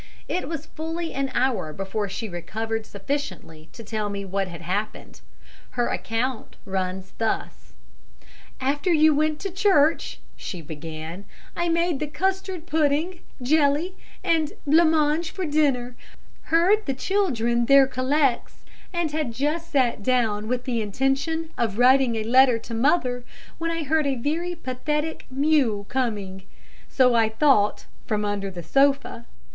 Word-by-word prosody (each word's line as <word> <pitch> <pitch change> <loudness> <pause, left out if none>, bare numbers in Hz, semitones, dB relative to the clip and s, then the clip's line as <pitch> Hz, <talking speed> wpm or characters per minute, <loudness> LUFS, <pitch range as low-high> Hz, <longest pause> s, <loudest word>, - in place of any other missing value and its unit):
It 365 - -2
was 320 -2 -4
fully 325 +1 -5
an 275 0 -1
hour 245 -11 +1
before 195 +2 -3
she 210 +4 -4
recovered 220 +5 -4
sufficiently 200 - -5
to 230 - -11
tell 215 -1 -3
me 200 -1 -4
what 195 0 -1
had 170 -1 -9
happened. 200 +5 -4 0.6
Her 240 - +2
account 230 +2 -2
runs 190 -1 -3
thus: 225 -1 -3 0.9
"'After 290 +7 0
you 310 -1 +5
went 305 +1 +1
to 390 - -3
church,' 345 -5 +2 0.2
she 180 - -6
began, 160 +4 -7 0.3
'I 345 0 0
made 335 -3 +1
the 305 - -2
custard 380 +1 -2
pudding, 315 +2 +1 0.2
jelly 300 +5 +2 0.3
and 320 -3 +1
blancmange 315 +1 +3
for 375 +1 -4
dinner, 275 -5 +1 0.5
heard 365 +6 +3
the 270 - 0
children 240 - +1
their 275 -1 +7
collects, 265 0 0 0.3
and 345 -4 -1
had 300 -5 -1
just 300 +7 -2
sat 255 -6 +2
down 220 -3 +1
with 250 +1 -1
the 240 -3 -1
intention 270 +9 -1
of 220 -4 0
writing 255 -1 +5
a 220 - -1
letter 250 +1 +5
to 230 +1 -9
mother, 250 0 +1 0.4
when 330 0 -1
I 330 -1 -2
heard 305 +1 +1
a 275 - +1
very 325 +8 -2
pathetic 300 +2 -3
mew 260 -7 +2
coming, 210 -7 -2 0.5
so 255 -2 +4
I 225 -2 +4
thought, 220 -3 +3 0.2
from 210 -1 0
under 205 -1 -2
the 175 -2 -8
sofa. 275 - +1
265 Hz, 140 wpm, -24 LUFS, 220-315 Hz, 0.9 s, their